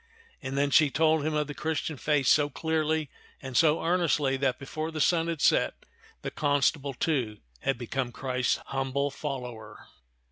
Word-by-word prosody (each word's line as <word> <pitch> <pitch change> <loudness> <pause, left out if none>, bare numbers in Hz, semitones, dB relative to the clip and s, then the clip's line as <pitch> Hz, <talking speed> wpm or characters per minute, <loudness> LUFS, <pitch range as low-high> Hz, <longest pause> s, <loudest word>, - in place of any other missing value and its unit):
And 135 0 -4
then 140 0 +1
she 150 0 +6
told 160 +1 +2
him 155 0 -1
of 150 0 +1
the 145 - -6
Christian 160 +1 -2
faith 145 0 +1
so 145 +2 +4
clearly 160 -1 -1 0.3
and 130 -2 -8
so 155 +3 +4
earnestly 165 -6 +2
that 130 -1 0
before 155 +3 -5
the 160 -1 -5
sun 165 +1 +3
had 165 -3 -3
set, - - +3 0.5
the - - -3
constable, 145 -1 +1
too, 125 -8 -1 0.2
had 135 - -1
become 125 +1 -3
Christ's 125 0 0
humble 135 +1 -1
follower. 125 -7 -6
145 Hz, 165 wpm, -28 LUFS, 135-155 Hz, 0.5 s, she